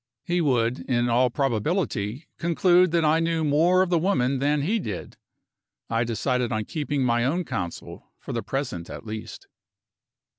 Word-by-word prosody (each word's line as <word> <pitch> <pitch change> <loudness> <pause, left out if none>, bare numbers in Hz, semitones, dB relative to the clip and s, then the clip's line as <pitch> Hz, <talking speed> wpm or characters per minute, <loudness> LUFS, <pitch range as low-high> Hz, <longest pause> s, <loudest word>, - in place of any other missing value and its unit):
He 175 0 0
would, 125 -4 +1
in 120 -1 +2
all 125 +2 +3
probability, 130 - -1
conclude 175 +2 +4
that 165 -1 +2
I 155 +2 +4
knew 165 -1 0
more 165 +5 +4
of 185 - -4
the 170 - +3
woman 135 -7 +1
than 145 +1 +1
he 215 +9 +1
did. 105 - -6 0.8
I 115 +1 +2
decided 120 +1 -1
on 110 -2 -1
keeping 145 -3 -2
my 120 -1 +2
own 165 +8 0
counsel, 90 - -6
for - - -7
the 115 - -1
present 110 -7 -4
at - - -8
least. 110 0 -7
135 Hz, 160 wpm, -25 LUFS, 120-165 Hz, 0.8 s, conclude